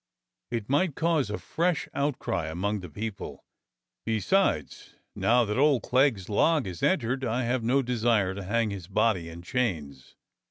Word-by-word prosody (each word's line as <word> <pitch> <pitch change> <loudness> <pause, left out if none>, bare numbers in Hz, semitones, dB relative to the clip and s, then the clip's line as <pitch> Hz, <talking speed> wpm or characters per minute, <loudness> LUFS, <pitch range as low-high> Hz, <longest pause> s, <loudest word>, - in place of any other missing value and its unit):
It 115 -3 -3
might 145 +3 +1
cause 160 -8 +1
a 105 - -2
fresh 170 -1 -1
outcry 125 - -1
among 100 +6 -2
the 90 -2 -9
people. 105 +6 -6 0.6
Be 110 -1 0
sides, 105 - 0 0.2
now 120 +1 +3
that 105 +4 -1
old 140 -4 +4
Clegg's 125 -7 +2
log 155 +7 +2
is 90 -3 -6
entered, 130 -6 +1
I've 120 +1 0
no 130 +4 +2
desire 115 -5 +1
to 100 - -6
hang 110 +3 0
his 95 -4 -7
body 95 -4 +1
in 85 +1 -10
chains. 80 - -3
115 Hz, 155 wpm, -27 LUFS, 95-130 Hz, 0.6 s, old